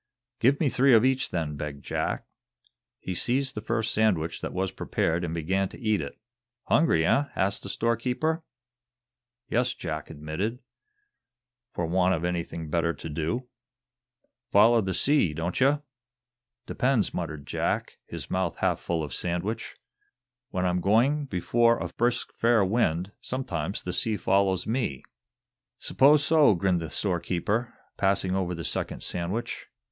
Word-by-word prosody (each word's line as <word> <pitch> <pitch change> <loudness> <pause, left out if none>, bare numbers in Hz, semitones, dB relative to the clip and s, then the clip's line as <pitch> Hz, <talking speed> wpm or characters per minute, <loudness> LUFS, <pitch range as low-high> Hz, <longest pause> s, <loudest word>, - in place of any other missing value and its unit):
"Give 135 +4 +3
me 155 - +2
three 130 -1 +5
of 110 +2 +5
each, 130 0 +1
then," 80 -4 -2
begged 70 -1 -6
Jack. - - -2 0.7
He 95 - -5
seized 130 +7 0
the 105 - -5
first 110 +1 -1
sandwich 90 -7 +1
that - - -4
was 95 +1 -1
prepared 85 +1 -1
and 85 - -2
began 90 +4 0
to - - -12
eat 110 -5 +1
it. 70 - -7 0.5
"Hungry, 120 - +3
eh!" 140 +11 +3
asked 100 +1 0
the 100 - -7
storekeeper. 125 - 0 1.0
"Yes," 125 +2 0
Jack 80 -3 -5
admitted; 80 +10 -3 1.1
"for 85 -9 -3
want 90 +2 +2
of 85 +1 -3
anything 85 -2 -3
better 85 0 +1
to 80 - -7
do." 80 - -2 1.0
"Foller 115 +3 +6
the 95 -2 -2
sea, 140 - +3
don't 85 - -2
ye?" 140 +3 +5 0.9
"Depends," 125 -4 +1
muttered 80 -4 -4
Jack, - - -2
his - - -7
mouth - - -1
half - - +1
full 85 -2 -2
of 70 -4 -5
sandwich. 90 +6 -3 0.7
"When 90 0 -1
I'm 90 0 +1
going 125 - +3
before 115 +4 +2
a - - -4
brisk 120 +1 0
fair 115 -3 +3
wind, 95 -3 0
sometimes 95 - -3
the 90 - -4
sea 110 -2 0
follows 95 0 +2
me." 110 - -2 0.7
"'Spose 145 +2 +4
so," 155 -9 +5
grinned 90 -1 +1
the 80 - -5
storekeeper, 100 +5 -1 0.2
passing 95 -1 +1
over 90 -2 -1
the 85 - -6
second - - -3
sandwich. 95 +8 -3
95 Hz, 145 wpm, -27 LUFS, 85-120 Hz, 1.1 s, Foller